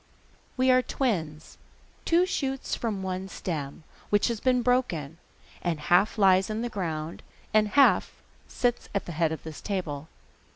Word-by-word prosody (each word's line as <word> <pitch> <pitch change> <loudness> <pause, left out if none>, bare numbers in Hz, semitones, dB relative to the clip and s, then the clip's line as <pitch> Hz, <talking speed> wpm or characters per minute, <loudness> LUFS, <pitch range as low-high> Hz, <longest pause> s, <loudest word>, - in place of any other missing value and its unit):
'We 255 0 +4
are 255 0 +5
twins, 165 - -3 0.5
two 345 +2 +4
shoots 270 -7 -2
from 210 -5 -2
one 185 0 -3
stem, 155 -5 -5 0.3
which 205 +3 +3
has 230 -2 -2
been 250 0 +2
broken, 175 - 0 0.4
and 170 -3 -1
half 180 +8 +3
lies 190 -1 +4
in 215 +2 -2
the 240 - -2
ground 165 -6 -4 0.3
and 215 0 +4
half 275 +6 +4 0.4
sits 245 -1 -1
at 200 - 0
the - - -6
head 160 -1 +1
of 160 - -5
this 160 -2 -8
table. 160 -7 -3
195 Hz, 155 wpm, -27 LUFS, 160-240 Hz, 0.5 s, are